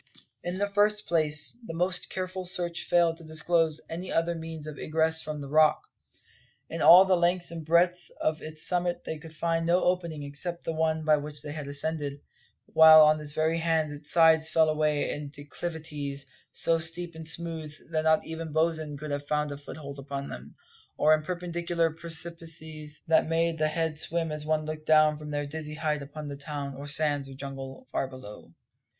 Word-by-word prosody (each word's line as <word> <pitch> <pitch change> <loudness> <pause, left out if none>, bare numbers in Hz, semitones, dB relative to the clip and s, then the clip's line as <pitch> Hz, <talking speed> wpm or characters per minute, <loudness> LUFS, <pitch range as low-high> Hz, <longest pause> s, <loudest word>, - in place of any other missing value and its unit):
In 175 +1 -3
the 205 - +1
first 210 +1 +2
place, 150 -3 +2
the 165 -7 -7
most 180 +2 +3
careful 185 0 -4
search 175 -2 0
failed 170 -2 +3
to 165 - -10
disclose 160 0 +1
any 175 +3 -5
other 165 +1 +1
means 160 -2 -7
of 155 -1 -8
egress 160 +1 +1
from 150 -1 -5
the 140 - -7
Rock. 155 +2 +4 0.9
In 165 - -4
all 175 +5 +9
the 190 -1 +3
length 175 0 +1
and 165 -1 -6
breadth 175 +3 +2
of 155 0 -1
its 155 0 -4
summit 175 -1 -1
they 160 - -5
could 160 0 -12
find 165 +1 0
no 175 +2 +3
opening 170 -4 -1
except 155 +5 -5
the 165 - -3
one 160 0 0
by 155 -1 +5
which 145 0 -6
they 145 - -6
had 150 -1 -6
ascended, 145 0 -2 0.5
while 160 -1 +8
on 155 0 +4
every 155 +2 -1
hand 160 -2 0
its 145 0 -3
sides 160 -1 +5
fell 160 -1 +3
away 150 -1 +1
in 145 -1 -5
declivities 145 -1 -5 0.3
so 165 0 0
steep 170 +1 -3
and 160 0 -9
smooth 160 -2 -3 0.2
that 155 -1 0
not 160 0 +3
even 160 -1 -6
Bosin 155 -1 0
could 150 +1 -6
have 145 0 -4
found 150 0 0
a 140 - -5
foothold 140 -1 -9
upon 140 0 -6
them 65 +4 -10 0.4
or 155 - +5
in 155 - +2
perpendicular 170 -1 -1
precipices 165 -2 -2
that 160 -1 +3
made 165 0 0
the 155 - +2
head 160 -1 -2
swim 165 0 -1
as 150 0 -5
one 155 -1 0
looked 155 0 -6
down 155 -1 +5
from 150 0 -8
their 145 0 -2
dizzy 155 +1 -6
height 155 -2 -1
upon 150 +2 -8
the 140 -1 -6
town, 140 -1 -5
or 140 +2 -8
sands, 145 -2 +1
or 135 - -10
jungle, 135 - -8
far 135 - -1
below. 130 -6 -11
155 Hz, 190 wpm, -28 LUFS, 150-165 Hz, 0.9 s, all